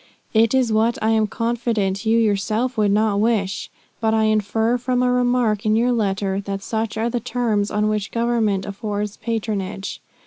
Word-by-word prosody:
It 225 Hz, +2 st, +4 dB
is 250 Hz, -4 st, +2 dB
what 225 Hz, +2 st, +2 dB
I 220 Hz, +1 st, +1 dB
am 220 Hz, -1 st, +2 dB
confident 225 Hz, -3 st, -1 dB
you 225 Hz, +1 st, +4 dB
yourself 220 Hz, +3 st, +1 dB
would 210 Hz, -3 st, +2 dB
not 205 Hz, 0 st, +2 dB
wish; 205 Hz, -3 st, 0 dB, 0.3 s
but 220 Hz, 0 st, +1 dB
I 220 Hz, -, +2 dB
infer 220 Hz, +2 st, +1 dB
from 250 Hz, 0 st, 0 dB
a 250 Hz, -, +2 dB
remark 245 Hz, -4 st, +1 dB
in 215 Hz, -1 st, +2 dB
your 240 Hz, +3 st, +2 dB
letter 195 Hz, -3 st, 0 dB
that 195 Hz, 0 st, -5 dB
such 220 Hz, -1 st, -2 dB
are 225 Hz, +1 st, 0 dB
the 245 Hz, -, -1 dB
terms 225 Hz, -4 st, -1 dB
on 210 Hz, 0 st, 0 dB
which 210 Hz, -1 st, -1 dB
Government 230 Hz, -5 st, 0 dB
affords 205 Hz, 0 st, -4 dB
patronage. 210 Hz, -4 st, -3 dB
220 Hz, 175 wpm, -21 LUFS, 205-235 Hz, 0.3 s, It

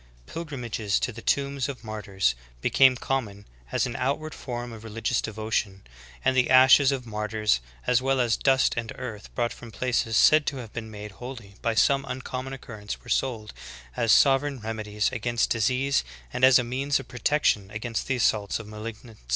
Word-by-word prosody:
Pilgrimages 120 Hz, -10 st, -3 dB
to -, -, -1 dB
the 115 Hz, 0 st, -10 dB
tombs 140 Hz, 0 st, 0 dB
of 135 Hz, -3 st, -7 dB
martyrs 100 Hz, -, -1 dB, 0.3 s
became 130 Hz, -, +5 dB
common 115 Hz, -6 st, -3 dB, 0.3 s
as -, -, +1 dB
an 120 Hz, -, -4 dB
outward 145 Hz, +5 st, -2 dB
form 120 Hz, -2 st, -6 dB
of 110 Hz, -1 st, -10 dB
religious 115 Hz, +2 st, -1 dB
devotion; 110 Hz, -3 st, -3 dB, 0.4 s
and 130 Hz, 0 st, +3 dB
the 130 Hz, -1 st, +3 dB
ashes 130 Hz, +2 st, +7 dB
of 130 Hz, -3 st, -3 dB
martyrs 105 Hz, -, 0 dB, 0.3 s
as 125 Hz, 0 st, +3 dB
well 135 Hz, 0 st, +1 dB
as 120 Hz, -3 st, +2 dB
dust 135 Hz, -1 st, +3 dB
and 115 Hz, -1 st, -3 dB
earth 110 Hz, -5 st, -7 dB
brought 120 Hz, -1 st, 0 dB
from 120 Hz, -, -11 dB
places 115 Hz, -2 st, 0 dB
said 155 Hz, -1 st, +6 dB
to 140 Hz, -, -1 dB
have 115 Hz, -4 st, -8 dB
been 115 Hz, -1 st, -6 dB
made 105 Hz, -1 st, -8 dB
holy 115 Hz, 0 st, -9 dB
by 115 Hz, -1 st, 0 dB
some 135 Hz, +4 st, +3 dB
uncommon 130 Hz, 0 st, -5 dB
occurrence 110 Hz, -6 st, -7 dB
were 125 Hz, -, -13 dB
sold 115 Hz, -6 st, -1 dB, 0.4 s
as 115 Hz, -, +2 dB
sovereign 135 Hz, 0 st, +4 dB
remedies 110 Hz, -1 st, -2 dB
against 120 Hz, 0 st, -1 dB
disease 125 Hz, -, +1 dB, 0.3 s
and 125 Hz, -, -3 dB
as 130 Hz, 0 st, +8 dB
means 130 Hz, +4 st, 0 dB
of 135 Hz, -, -9 dB
pro 120 Hz, -, -9 dB
tection 110 Hz, -8 st, +1 dB
against 110 Hz, +1 st, -4 dB
the 130 Hz, -, +1 dB
assaults 105 Hz, -4 st, +1 dB
of 115 Hz, -, -8 dB
malignant 110 Hz, +1 st, -8 dB, 0.2 s
spirits. -, -, -27 dB
120 Hz, 180 wpm, -26 LUFS, 110-130 Hz, 0.4 s, as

